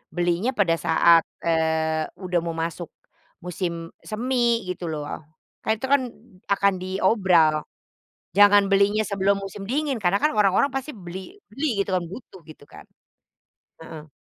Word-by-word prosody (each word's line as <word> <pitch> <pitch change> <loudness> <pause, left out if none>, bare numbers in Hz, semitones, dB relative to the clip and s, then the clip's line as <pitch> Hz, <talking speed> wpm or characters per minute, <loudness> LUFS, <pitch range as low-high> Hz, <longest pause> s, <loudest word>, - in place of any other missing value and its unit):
belinya 175 +7 0
pada 200 -9 +1
saat, 165 0 +4 0.2
eee, 160 -1 +1 0.2
udah 180 -2 -1
mau 170 - -3
masuk 170 +1 -5 0.5
musim 170 -2 -4 0.2
semi, 235 -1 0
gitu 180 -2 -4
loh. 150 -2 -5 0.6
Kan 220 - 0
itu 265 - -3
kan, 280 - +4 0.5
akan 200 0 +3
diobral. 185 -5 +2 0.7
Jangan 205 0 +6
belinya 200 +2 +3
sebelum 200 0 0
musim 195 +1 -8
dingin, 275 +5 -1
karena 200 -2 +1
kan 305 - +2
orang-orang 200 +5 +3
pasti 270 +2 -5
beli 190 - -10
beli 250 -2 -2
gitu 200 - -1
kan, 180 - -2
butuh 190 +2 -11
gitu 155 -2 -14
kan. - - -13 1.0
Heeh. 155 -1 -10
190 Hz, 140 wpm, -24 LUFS, 170-215 Hz, 1.0 s, Jangan